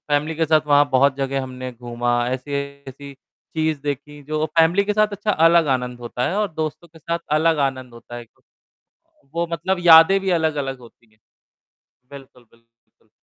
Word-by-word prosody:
Family 150 +2 0
के 160 +1 0
साथ 155 -1 +2
वहाँ 145 0 +4
बहुत 135 +1 +3
जगह 135 0 -2
हमने 130 0 -7
घूमा, 120 0 -2
ऐसी-ऐसी 140 +1 -6 0.4
चीज़ 155 -2 -1
देखीं 145 +1 -6
जो 155 +2 -2
फैमिली 170 +5 +4
के 210 - -1
साथ 215 0 +2
अच्छा 210 +1 -2 0.2
अलग 165 -1 +4
आनंद 125 -1 -7
होता 120 +1 -3
है 195 - -3
और 210 -1 0
दोस्तों 160 +2 -5
के 160 - -18
साथ 170 +2 -3 0.2
अलग 160 0 +2
आनंद 130 -2 -10
होता 120 +1 -11
है। 120 - -8
तो 115 - -36 0.9
वो 170 0 -1
मतलब 180 +3 -1
यादें 165 +4 +8
भी 190 0 -2
अलग 160 -3 +1
अलग 135 -1 -5
होती 115 -2 -19
हैं। 110 - -32 0.9
बिल्कुल, 135 -3 -14
बिल्कुल। 115 -1 -33
145 Hz, 175 wpm, -21 LUFS, 125-160 Hz, 0.9 s, यादें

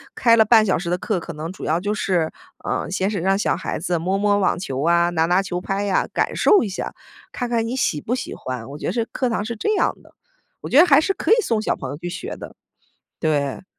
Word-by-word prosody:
开 230 -2 +5
了 220 - +6
半 220 0 +5
小 190 - +2
时 170 0 -4
的 180 - +1
课， 185 -2 -2
可 170 - -7
能 155 +1 -6
主 - - -10
要 160 +3 +1
就 205 +3 -2
是， 175 -6 0 0.4
嗯， - - -2
先 190 +1 0
是 205 - -2
让 195 +2 +2
小 - - +1
孩 - - -4
子 175 +1 -1
摸 185 +4 -1
摸 205 0 +2
网 190 -3 +1
球 135 -6 -4
啊、 170 +1 +3
拿 160 -2 +1
拿 180 +3 +3
球 180 -2 -4
拍 195 +2 -2
呀， 195 -2 +1
感 - - -1
受 415 - +5
一 - - -3
下， 190 - -5 0.4
看 245 -2 -4
看 230 -1 0
你 250 +3 -3
喜 150 - 0
不 235 - -2
喜 255 - -4
欢， 125 -1 -6
我 145 - -7
觉 - - -3
是 230 -2 -1
课 255 - 0
堂 220 -3 -1
是 235 +1 -4
这 425 - 0
样 - - +1
的。 - - -21 0.5
我 - - -6
觉 270 - +3
得 335 - +9
还 350 - +6
是 390 +5 +1
可 - - -2
以 - - +9
送 225 - 0
小 - - 0
朋 130 - -6
友 140 - -5
去 175 +3 -6
学 - - -6
的， - - -10 0.7
对。 145 +1 -1
190 Hz, 285 characters per minute, -22 LUFS, 170-225 Hz, 0.7 s, 得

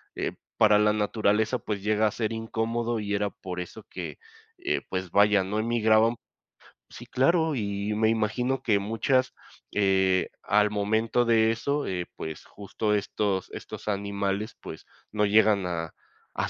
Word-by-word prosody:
eh, - - -2 0.3
para 105 -1 +5
la 105 0 +3
naturaleza, 110 +2 +1
pues, 100 -2 -4
llega 110 0 +2
a - - -1
ser 115 -1 -2
incómodo 115 +1 -2
y 105 -1 -3
era 100 0 0
por 90 -2 -7
eso 90 - -9
que, - - -6 0.4
eh, 360 +1 -1
pues, 95 -2 -4
vaya, 100 -1 +4
no 105 +3 -2
emigraban 110 0 +3 0.7
Sí, - - -11
claro, 160 +4 +2
y 100 -2 -2
me 110 +1 +2
imagino 120 +4 0
que 105 -5 +3
muchas, 130 +5 0 0.4
eh, 95 -2 +2
al 105 0 +3
momento 110 +4 +1
de 115 -1 +4
eso, 140 +5 -1
eh, 90 -2 -2
pues, 80 -1 -7
justo 105 +1 -3
estos 100 -1 -1
estos - - -9
animales, 100 +1 -2
pues, - - -9 0.3
no 105 0 +1
llegan 105 -1 +4
a 80 -2 -4 0.5
a - - 0
105 Hz, 155 wpm, -27 LUFS, 100-115 Hz, 0.7 s, para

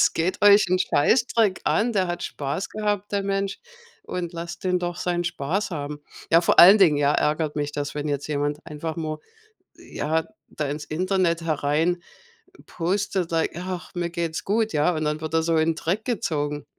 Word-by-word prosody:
Es - - +4
geht 170 +3 -1
euch 205 0 +7
'n 185 +1 +2
Scheißdreck 220 - +2
an, 230 +3 +1
der 190 -3 +1
hat 175 0 -4
Spaß 140 +6 -4
gehabt, 210 -1 -2
der 200 -1 0
Mensch. 195 0 -2 0.5
Und 175 - -4
lasst 170 0 -7
den 180 -1 +2
doch 175 0 -3
seinen 175 -1 -1
Spaß 175 +5 -2
haben.” 145 -3 -5 0.3
Ja, 165 - +6
vor - - +2
allen 195 +5 +9
Dingen, 165 -7 +5
ja, 145 0 +2
ärgert 150 0 0
mich 145 0 -2
das, 145 0 -4
wenn 150 0 -3
jetzt 145 -1 -2
jemand 145 0 -1
einfach 160 0 -5
mal, 155 -2 -3 0.6
ja, 160 +1 -2 0.2
da 150 -2 -3
ins 145 +1 -5
Internet 180 0 0
herein 160 +2 0 0.7
postet, 185 0 -1
like: 165 -1 +1
„Ach, 180 0 -6
mir 175 -1 -2
geht's 170 -2 -3
gut“, 220 +2 0
ja? 150 +4 +2
Und 155 0 -2
dann 150 0 -1
wird 160 0 -5
er 160 - +3
so 165 0 +1
in 160 +1 +2
Dreck 180 +7 -2
gezogen. 150 - -2
170 Hz, 185 wpm, -24 LUFS, 150-185 Hz, 0.7 s, allen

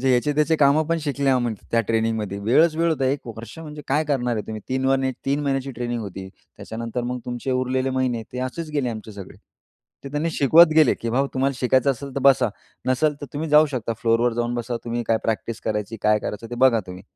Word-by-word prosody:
जे 135 +1 +2
याचे 125 +4 +2
त्याचे 155 +2 +2
काम 145 +2 +4
पण 165 0 +1
शिकले 140 -2 0
आम्ही 120 -3 +1 0.2
त्या 115 - +4
ट्रेनिंगमध्ये. 110 -2 -1
वेळच 155 +10 +4
वेळ 165 +1 +2
होता 145 -4 0
1 135 0 -1
वर्ष 115 +6 -9
म्हणजे 150 -2 -8
काय 150 +3 +2
करणार 125 -5 0
आहे 105 - -2
तुम्ही. 110 -1 -5
तीन 130 +1 -1
वन 135 0 +2 0.2
3 140 +2 +1
महिन्याची 135 -1 -1
ट्रेनिंग 120 0 -3
होती, 95 -1 -7 0.3
त्याच्यानंतर 115 +2 -5
मग 125 +1 -3
तुमचे 120 +2 -4
उरलेले 130 +1 0
महिने 130 -3 -1
ते 125 - -5
असेच 155 +5 -4
गेले 140 -4 0
आमचे 110 -1 -7
सगळे. 100 -2 -10 0.7
ते - - -5
त्यांनी 150 +3 -1
शिकवत 160 +3 +6
गेले 155 -5 +6
की, 115 - -4
"भाऊ 135 +4 +1
तुम्हाला 135 +1 +1
शिकायचं 130 +1 +3
असेल 135 +1 -9
तर - - 0
बसा, 135 -3 +5 0.4
नसेल 140 +4 +2
तर 145 - -6
तुम्ही 155 +2 -3
जाऊ 150 +1 +7
शकता 115 -3 -2
फ्लोरवर 115 +1 +2
जाऊन 120 0 -1
बसा. 120 0 -3
तुम्ही 120 0 -2
काय 115 - +3
प्रॅक्टिस 115 0 -2
करायची 105 +1 -3
काय 105 0 +4
करायचं 105 +2 -5
ते - - -4
बघा 115 -4 +3
तुम्ही." 90 0 -9
130 Hz, 220 wpm, -23 LUFS, 115-140 Hz, 0.7 s, जाऊ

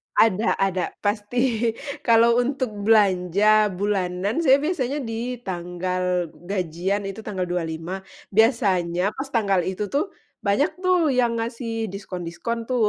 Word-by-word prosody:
Ada 220 0 +3
ada. 190 -2 0 0.2
Pasti 225 +2 0 0.2
kalau 235 0 +4
untuk 255 -1 -1 0.2
belanja 210 0 +4
bulanan, 195 - -1
saya 280 -3 +4
biasanya 290 -4 -1
di 230 +2 -3
tanggal 180 -1 -2
gajian, 185 +2 -2
itu 195 +2 -6
tanggal 200 -4 -3
25. 175 +1 -3 0.3
Biasanya 195 -5 +2
pas 270 +5 -6
tanggal 205 -7 +1
itu 190 +2 -3
tuh, 295 +8 +1 0.3
banyak 220 - +1
tuh, 365 -5 +3
yang 245 -2 +2
ngasih 230 -2 -3
diskon-diskon, 190 +4 -5
tuh. 235 -2 +1
210 Hz, 120 wpm, -23 LUFS, 185-235 Hz, 0.3 s, kalau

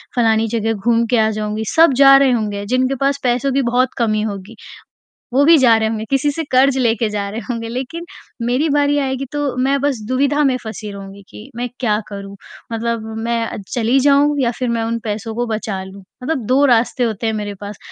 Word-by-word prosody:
फ़लानी 225 -2 +2
जगह 225 0 -1
घूम 230 +3 +1
के 245 - +3
आ 220 0 +3
जाऊँगी, 215 +1 -3
सब 325 -4 +6
जा 275 -1 +8
रहे 275 -2 +4
होंगे, 205 -3 -2
जिनके 255 +4 0
पास 280 0 +1
पैसों 250 +2 +1
की 275 - +2
बहुत 250 +1 +1
कमी 215 -3 +1
होगी, 205 +1 -5 0.8
वो 280 +2 +4
भी 330 0 +7
जा 240 -4 +5
रहे 220 0 0
होंगे। 220 0 -3
किसी 275 +1 +1
से 325 +3 -4
कर्ज़ 265 +1 +4
लेकर 230 -2 +1
जा 205 -1 -3
रहे 215 - -5
होंगे 230 -1 -3
लेक़िन 270 +8 -5 0.4
मेरी 255 +6 +1
बारी 290 0 +2
आएगी 265 0 -2
तो 290 -3 -2
मैं 275 +1 +1
बस 280 -5 0
दुविधा 280 +3 +1
में 265 -2 +2
फँसी 215 -1 -7
रहूँगी 200 0 -10
कि 220 +6 -12
मैं 245 +1 -3
क्या 215 -4 +1
करूँ? 200 -1 -8 0.4
मतलब 230 0 -2 0.2
मैं 230 0 -1 0.2
चली 240 +3 +2
जाऊँ 285 +2 +3
या 245 -3 +1
फ़िर 250 -2 -1
मैं 230 -1 -1
उन 230 +1 -2
पैसों 220 +1 -4
को 240 0 -1
बचा 215 -3 -3
लूँ, 190 +1 -12 0.2
मतलब 260 -5 -2
2 265 +3 +3
रास्ते 245 0 +2
होते 225 -1 -2
हैं 220 - 0
मेरे 210 -1 -4
पास 205 0 -7
235 Hz, 210 wpm, -18 LUFS, 220-270 Hz, 0.8 s, जा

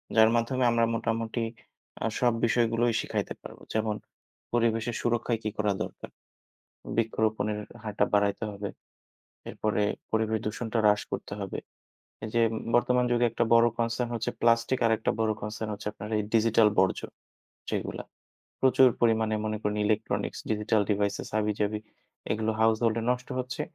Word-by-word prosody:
যার 110 0 +7
মাধ্যমে 125 +2 +1
আমরা 115 0 +3
মোটামুটি 115 +1 -1 0.6
আ - - +1
সব 120 -2 +3
বিষয়গুলোই 115 0 +2
শিখাইতে - - -3
পারব। - - -11
যেমন 110 -1 0 0.6
পরিবেশের 115 0 +1
সুরক্ষায় 120 -1 0
কী 110 - 0
করা 105 -2 +1
দরকার? - - -8 0.9
বৃক্ষরোপণের 110 -2 0 0.2
হারটা 105 -1 +1
বাড়াইতে 100 +1 +2
হবে। 100 0 -5 0.8
এরপরে 105 -1 0 0.3
পরিবেশ 110 0 +1
দূষণটা 110 +2 -3
হ্রাস 105 0 +4
করতে 100 - -4
হবে। 95 - -4 0.7
এই 110 - -4
যে 115 - +4
উম - - -2 0.2
বর্তমান 125 +1 +3
যুগে 120 0 +3
একটা 115 +1 +1
বড় 115 0 +6
concern 115 +1 0
হচ্ছে 115 -1 -1
plastic, 115 +2 +3
আরেকটা 110 -1 +2
বড় 110 - +2
concern 110 +1 -4
হচ্ছে 105 0 -4
আপনার 105 0 -8
এই - - +1
digital 115 -1 +5
বর্জ্য 95 0 +3 0.7
যেগুলা। - - -3 0.6
প্রচুর 130 0 +6
পরিমাণে 110 -2 +3
মনে 110 0 -1
করেন 105 0 -1
electronics, 110 +1 -1
digital 105 0 +2
devices, 100 0 -1
হাবিজাবি 105 0 0 0.5
এগুলো 110 +1 0
household-এ 110 0 +3
নষ্ট 125 0 -3
হচ্ছে। 125 0 -3
110 Hz, 140 wpm, -28 LUFS, 105-115 Hz, 0.9 s, যার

